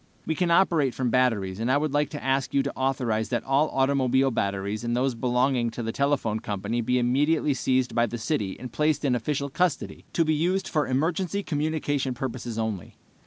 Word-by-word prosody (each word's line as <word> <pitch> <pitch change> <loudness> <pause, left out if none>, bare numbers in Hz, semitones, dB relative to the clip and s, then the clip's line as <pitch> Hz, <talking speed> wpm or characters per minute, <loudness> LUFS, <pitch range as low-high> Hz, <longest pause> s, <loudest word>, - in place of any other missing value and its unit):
We 160 - 0
can 175 +2 0
operate 170 -7 +3
from 125 -3 -1
batteries, 110 -7 +1
and 115 +3 0
I 135 - +4
would 150 -1 -1
like 145 0 +1
to 145 - -7
ask 135 +1 0
you 135 - +3
to 140 - -4
authorize 125 -5 0
that 120 - -1
all 140 +3 +2
automobile 135 -1 +2
batteries 100 0 -2
and 120 0 -1
those 130 +1 +1
belonging 125 +1 +1
to 115 +1 -6
the 115 - -2
telephone 135 -5 0
company 105 +2 -3
be 125 +2 +1
immediately 145 +5 +2
seized 130 -1 0
by 120 0 +2
the 120 - -5
city 105 -4 -2
and 125 -2 -7
placed 150 -1 +1
in 130 - +2
official 140 +4 -1
custody, 180 +2 -1
to 165 - +2
be 155 - +2
used 180 +5 0
for 150 -3 0
emergency 170 +8 0
communication 145 -4 -1
purposes 120 -3 -5
only. 110 -6 -3
130 Hz, 200 wpm, -26 LUFS, 120-150 Hz, -, I